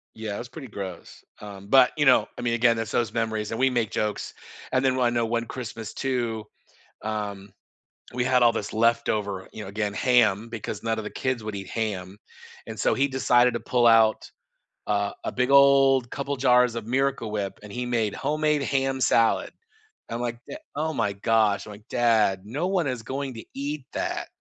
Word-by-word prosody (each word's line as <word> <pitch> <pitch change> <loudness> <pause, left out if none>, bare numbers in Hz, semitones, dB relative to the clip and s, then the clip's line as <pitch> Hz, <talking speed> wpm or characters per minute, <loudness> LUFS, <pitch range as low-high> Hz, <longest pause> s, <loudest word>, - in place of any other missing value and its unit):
Yeah, 110 -2 -5
it - - -4
was 120 - -7
pretty 140 -3 -9
gross, 95 -4 -8 0.2
um, 100 -1 -10
but, 130 +1 +6
you 150 - +1
know, 130 -2 +5
I - - -5
mean, 120 -1 0
again, 120 0 +3
it's 115 -1 -4
those 115 -3 0
memories, 110 -2 -2
and 115 - -3
we 130 - +4
make 120 -4 -1
jokes, 105 -1 -2 0.4
and 130 0 +2
then 130 -1 +2
one 125 - +2
I 120 - +4
know 115 - +2
one 115 +1 -1
Christmas, 115 -3 -7
too, 120 -5 -2 0.6
um, 105 -2 -4 0.6
we 125 0 0
had 125 0 +3
all 120 -1 +5
this 105 - -4
leftover, 110 -4 0
you 110 - -8
know, 95 - -8
again, 105 0 -2
ham, 115 -3 +3
because 110 -2 -6
none 115 0 -1
of 110 - -4
the - - -5
kids 130 -4 -2
would 110 -1 -5
eat 95 -1 -6
ham; 100 -4 -4 0.5
and - - -7
so, - - +2
he 140 +2 +2
decided 125 -2 +3
to 120 - -2
pull 120 -1 +1
out 115 -1 +4 0.6
a 100 -1 0
a - - -1
big 125 +1 0
old 135 -2 +5
couple 140 +1 -3
jars 125 -2 +4
of 115 -2 -4
Miracle 130 -2 0
Whip, 100 -2 -3
and 105 -1 -10
he 125 0 -3
made 115 -4 0
homemade 150 -1 0
ham 135 -1 0
salad. 115 -1 +2 0.6
I'm 115 - -4
like, 120 -1 -3
"Da 300 - -6 0.2
oh 160 +1 -1
my 115 -6 0
gosh." 110 0 +1
I'm 105 - -9
like, 105 +1 -15
"Dad, 110 -5 +2
no 145 +11 -2
one 185 -6 0
is 125 -3 -3
going 135 +1 -4
to 115 - -9
eat 140 0 -4
that. - - -3
115 Hz, 205 wpm, -25 LUFS, 105-130 Hz, 0.6 s, but